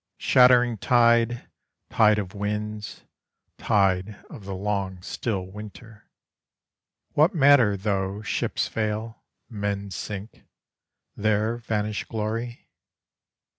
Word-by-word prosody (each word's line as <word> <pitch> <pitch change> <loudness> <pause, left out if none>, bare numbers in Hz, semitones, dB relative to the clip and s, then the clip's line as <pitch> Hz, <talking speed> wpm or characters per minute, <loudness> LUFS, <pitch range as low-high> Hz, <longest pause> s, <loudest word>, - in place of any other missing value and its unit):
Shattering 125 -3 +4
tide, 120 0 +3 0.4
tide 105 -1 +4
of 100 -2 -4
winds, 105 0 -4 0.6
tide 95 0 +1 0.2
of 100 - -10
the 95 -1 -5
long 95 -1 -3
still 100 -2 -3
winter, 105 +2 -12 1.0
What 160 +7 +3
matter 135 -9 +5
though 100 0 -2
ships 105 - -1
fail, 110 +1 -3 0.3
men 100 -2 -4
sink, 105 +2 -7 0.7
there 110 +2 0
vanish 105 -3 -3
glory? 115 +2 -4
105 Hz, 95 wpm, -25 LUFS, 100-115 Hz, 1.0 s, matter